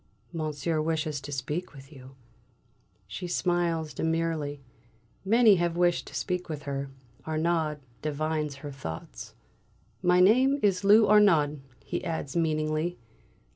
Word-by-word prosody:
"Monsieur 155 0 -2
wishes 155 -2 -2
to 145 - -8
speak 150 +6 -4
with 135 +2 -13
you." 130 -1 -13 0.9
She 180 - -6
smiles 170 -3 0
demurely. 160 -3 -2 0.6
Many 215 0 +5
have 170 -1 -1
wished 175 -1 +2
to - - -10
speak 180 -2 -3
with 150 -2 -5
her. 140 -2 -4 0.4
Arnaud 160 -1 0 0.2
divines 155 -1 -2
her 145 - -5
thoughts. 80 -13 -8 0.7
"My 180 0 +4
name 255 +9 +5
is 195 -2 +2
Lou 210 +2 +6
Arnaud!" 165 -9 +4 0.3
he - - -3
adds 160 -4 -4
meaningly. 155 +1 0
160 Hz, 125 wpm, -28 LUFS, 150-180 Hz, 0.9 s, Lou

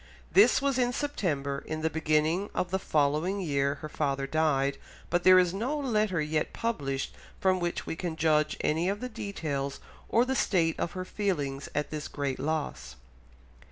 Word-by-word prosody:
This - - +6
was 275 -2 +1
in 245 0 +2
September. 150 - -1
In 155 0 -3
the 160 - +1
beginning 160 +4 +1
of 180 - -1
the 190 - +1
following 155 +5 +1
year 140 -5 0
her 155 - -4
father 140 -3 -1
died, 140 -2 +1 0.3
but 175 +1 +2
there 185 0 +8
is 180 -1 +4
no 245 +10 -1
letter 215 - +1
yet 155 0 -1
published 140 -13 -2 0.3
from 185 -1 +2
which 175 -1 -2
we - - -3
can 170 -1 -3
judge 155 -1 +2
any 165 +4 +1
of 200 +1 -2
the 250 - -4
details 150 - -4 0.3
or 235 +2 +4
the 265 - 0
state 165 -9 +1
of - - -2
her 185 -1 -4
feelings 145 -10 -2
at 150 0 -1
this 150 -2 -4
great 140 -2 -3
loss. 145 - -3
160 Hz, 175 wpm, -29 LUFS, 145-190 Hz, 0.3 s, there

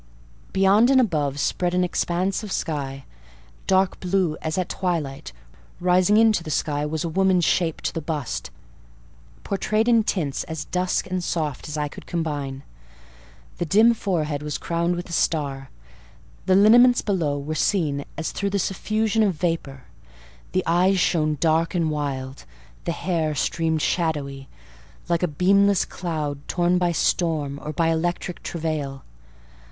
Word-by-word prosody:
Beyond 195 +5 +4
and 270 -1 +5
above 150 - 0
spread 180 +4 0
an 180 - +3
expanse 180 +2 -1
of 210 -3 -7
sky, 135 -5 -3 0.6
dark 190 -1 +2
blue 180 -3 0
as 155 +2 -3
at 185 -1 0
twilight: 160 -7 -3 0.5
rising 180 +3 +3
into 220 -5 +4
the 160 - -7
sky 150 -1 -1
was 155 0 -3
a - - -2
woman's 185 0 +2
shape 165 -3 +1
to - - -2
the 165 - -3
bust, 150 -4 -4 0.9
portrayed 215 +3 0
in 230 -2 +5
tints 160 -10 -1
as 160 -2 -5
dusk 180 0 -1
and 185 -1 -1
soft 155 -5 -3
as 150 - -4
I 150 0 -1
could - - -12
combine. 145 -5 -3 1.0
The 175 - 0
dim 220 +7 +5
forehead 160 -9 -2
was 150 -1 -3
crowned 170 +1 -1
with 175 +1 -5
a 170 - -8
star; 140 -5 -1 0.8
the 185 - +5
lineaments 240 +5 +6
below 165 -8 0
were 145 +2 -4
seen 155 -4 0
as 160 - -3
through 200 - -2
the 200 - -1
suffusion 215 +3 0
of 200 -5 +2
vapour; 155 -6 -3 0.7
the 185 - 0
eyes 185 +3 +3
shone 155 -4 +1
dark 165 +2 +1
and 165 -3 +1
wild; 135 -3 -4 0.4
the - - 0
hair 165 -4 -1
streamed 160 +2 0
shadowy, 140 -5 -1 0.6
like 170 -1 +1
a 180 - +2
beamless 195 +5 +3
cloud 155 -5 -4
torn 175 0 +1
by 175 -1 +1
storm 155 -4 0
or 150 - -4
by 165 +1 +1
electric 175 +2 -2
travail. 155 -5 -4
170 Hz, 150 wpm, -23 LUFS, 150-185 Hz, 1.0 s, lineaments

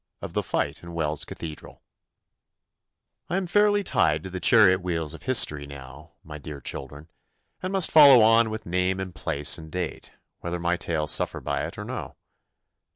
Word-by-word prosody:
Of - - -8
the - - 0
Fight 70 +3 -3
in 85 0 -10
Wells 75 -3 -2
Cathedral 80 -2 -9 1.5
I 180 - -1
am 190 - -2
fairly 205 +3 +2
tied 80 - +1
to 95 - -8
the 95 - -5
chariot 95 -4 +5
wheels 80 -4 -3
of 80 - -11
history 75 - +1
now, 70 +2 -12
my 75 -1 -9
dear 75 0 -8
children, 70 +4 -7 0.5
and 185 - -4
must 190 -3 +3
follow 140 -6 +8
on 115 +1 +4
with 110 0 -6
name 90 +2 -1
and 95 -2 -5
place 75 0 -1
and 80 -1 -12
date, 90 0 -5 0.3
whether 85 0 -4
my 85 +1 0
tale 80 -3 -3
suffer - - 0
by - - -3
it - - -11
or - - -6
no. - - -7
85 Hz, 175 wpm, -25 LUFS, 75-110 Hz, 1.5 s, follow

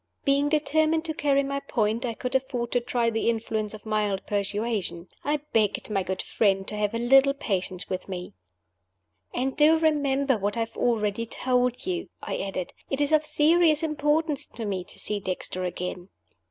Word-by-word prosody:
Being 280 +1 +3
determined 315 +2 +2
to 320 - -2
carry 280 -2 +2
my 275 0 -2
point, 230 -3 -1
I 230 - -3
could 250 +2 -4
afford 255 -2 -1
to 245 - +3
try 235 -1 0
the 225 +1 +1
influence 220 -2 -1
of 215 - -13
mild 210 -3 -1
persuasion. 205 -3 -2
I 295 0 0
begged 215 -1 +1
my 195 -2 +1
good 190 0 -3
friend 195 -2 +1
to - - -5
have 210 +1 -1
a - - +1
little 270 +4 +5
patience 185 -8 -2
with 185 +1 -4
me. 180 -1 -6 1.0
"And 260 +2 -1
do 310 +2 +6
remember 280 -5 +2
what 205 +3 -1
I - - +1
have 225 - -4
already 230 -1 0
told 250 0 +1
you," 360 -1 -3
I - - -4
added. 190 -2 -4 0.2
"It 270 - -1
is 290 +1 +1
of 310 -1 +3
serious 310 +1 +4
importance 305 -1 +1
to 230 - -7
me 190 -3 -2
to - - -10
see 210 -1 0
Dexter 185 -1 -3
again." 180 +1 -5
235 Hz, 180 wpm, -26 LUFS, 205-285 Hz, 1.0 s, do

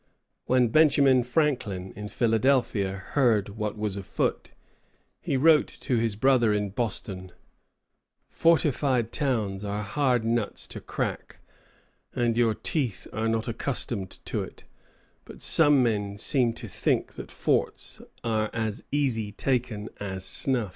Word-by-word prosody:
When 125 -2 +3
Benjamin 140 -2 +5
Franklin, 120 - -1
in 105 +1 -6
Philadelphia, 115 -3 +1 0.2
heard 115 -8 +2
what 105 +1 -4
was 105 -2 -2
afoot, 95 -2 -2 0.7
he 135 - -1
wrote 155 +2 +5
to 130 - 0
his 115 -2 0
brother 120 -1 +3
in 105 -1 -1
Boston, 100 -4 -4 1.0
"Fortified 140 -7 +2
towns 110 -9 -1
are 105 +1 -3
hard 125 +1 +1
nuts 115 -2 -1
to - - -7
crack, - - -4 0.8
and 120 -2 +1
your 115 -2 +2
teeth 125 - -2
are 110 +1 -1
not 110 +1 0
accustomed 115 -4 -2 0.2
to - - -2
it; - - -9 0.6
but - - -12
some 115 -10 +3
seem 120 +2 +1
to - - -7
think - - -1
that - - -9
forts - - -1 0.2
are 110 -2 0
as 110 -2 -3
easy 120 -8 0
taken 115 -2 -1
as 95 -2 -5
snuff." 125 -6 +1
115 Hz, 125 wpm, -27 LUFS, 105-130 Hz, 1.0 s, Benjamin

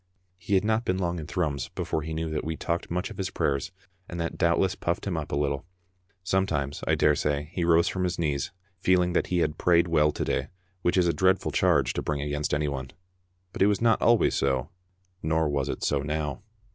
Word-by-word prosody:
He 100 +2 0
had 95 - +2
not 110 +1 +1
been 95 -5 0
long 85 -2 -1
in 75 - -7
Thrums 75 -7 -1
before 80 - -2
he 80 +1 -5
knew 80 +1 -2
that 75 - -2
we 80 0 -3
talked 85 0 -2
much 90 +6 -2
of 100 - -10
his 95 - -1
prayers, 70 +3 -1 0.4
and 85 - -5
that 85 0 -2
doubtless 85 +2 +2
puffed 85 +1 -2
him 95 -3 -1
up 80 -2 -4
a - - 0
little. 70 -1 -1 0.6
Sometimes, 80 -7 -1
I - - +3
daresay, 75 0 +1
he 90 - -2
rose 85 +1 +4
from 95 -1 -1
his 90 -1 -1
knees 70 -5 -1 0.3
feeling 90 -1 +3
that - - +1
he 90 -1 +1
had 75 0 -5
prayed 85 0 +4
well 75 -2 +3
to - - -3
day, - - -1 0.3
which 90 - +1
is 90 - +4
a 85 - +2
dreadful 95 +1 +2
charge - - +2
to - - -2
bring 75 -1 -2
against 75 +1 -2
anyone. 70 -3 -1 0.6
But - - -6
it 100 - +6
was 105 -2 +2
not 115 -1 +3
always 120 -1 +4
so, 65 -1 0 0.5
nor 80 0 +1
was 70 -2 -1
it - - -4
so 70 - +1
now. 75 +1 -3
80 Hz, 220 wpm, -27 LUFS, 75-90 Hz, 0.6 s, it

